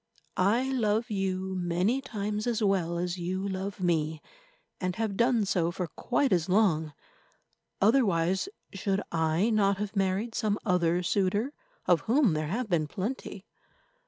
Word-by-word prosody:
I 205 +7 +3
love 225 -3 0
you 190 -1 -1
many 180 +8 0
times 210 -3 -3
as 230 -2 0
well 180 -4 +1
as 180 +1 -2
you 185 +3 -2
love 195 +1 -4
me, 160 -3 0 0.6
and 185 -1 -2
have 220 -2 -2
done 235 -1 +3
so 180 -4 +1
for 180 +1 -3
quite 250 - 0
as 175 0 +1
long. 170 -7 +2 0.9
Otherwise, 195 - +2 0.2
should 195 +1 -1
I 165 +6 +1
not 200 -2 +3
have 210 0 -4
married 195 +4 0
some 210 -3 0
other 180 -2 +2
suitor, 205 - 0 0.3
of 170 -4 +4
whom 245 - +4
there 155 0 -1
have 225 +8 -2
been 165 -6 +1
plenty? 200 - -5
195 Hz, 145 wpm, -29 LUFS, 175-215 Hz, 0.9 s, of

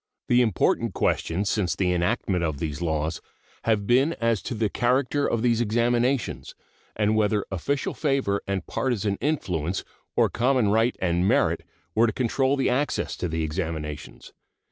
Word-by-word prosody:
The 125 0 +5
important 110 -6 +1
questions 95 +5 0
since 95 -3 0
the 90 -2 +1
enactment 90 0 0
of 80 -4 -1
these 75 -1 -4
laws 80 -1 -1 0.4
have 110 -3 +1
been 130 +8 +3
as 115 - 0
to 120 - -4
the 110 0 +1
character 130 +6 +1
of 115 -1 -1
these 120 -1 +2
examinations, 120 +3 0 0.4
and 105 0 +2
whether 105 -1 +1
official 130 +10 -1
favor 135 -9 0
and 95 -2 -2
partisan 110 -6 -1
influence 95 - -1 0.3
or - - +4
common 125 -3 +2
right 115 +4 +2
and 90 0 +1
merit - - +2 0.3
were 115 +4 +4
to 110 - -1
control 130 +2 +1
the 135 - +1
access 135 +4 0
to 90 - -2
the 80 -1 -2
examinations. 80 -2 -5
110 Hz, 155 wpm, -25 LUFS, 90-125 Hz, 0.4 s, The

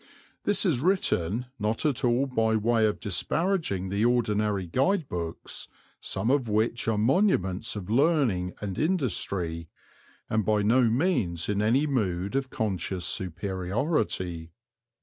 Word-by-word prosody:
This 205 +1 +2
is 160 -10 +2
written 125 - 0
not 110 +6 -1
at 145 -5 0
all 125 +2 +3
by 115 -4 +1
way 110 0 +2
of 105 - -2
disparaging 110 - 0
the 100 +3 0
ordinary 105 -5 +1
guide 145 - +1
books, 85 -2 -5 0.3
some 115 - -1
of 135 -5 +1
which 110 +3 0
are 110 -2 +1
monuments 110 - +1
of 100 -4 -6
learning 120 - +2
and 100 -3 -4
industry, 95 - -1 0.6
and 110 0 0
by 105 0 +1
no 120 +5 +4
means 115 - +1
in 105 0 +1
any 120 +7 +3
mood 100 -8 -1
of 135 -1 -1
conscious 95 -5 -2
superiority. 95 - -2
110 Hz, 130 wpm, -27 LUFS, 95-130 Hz, 0.6 s, no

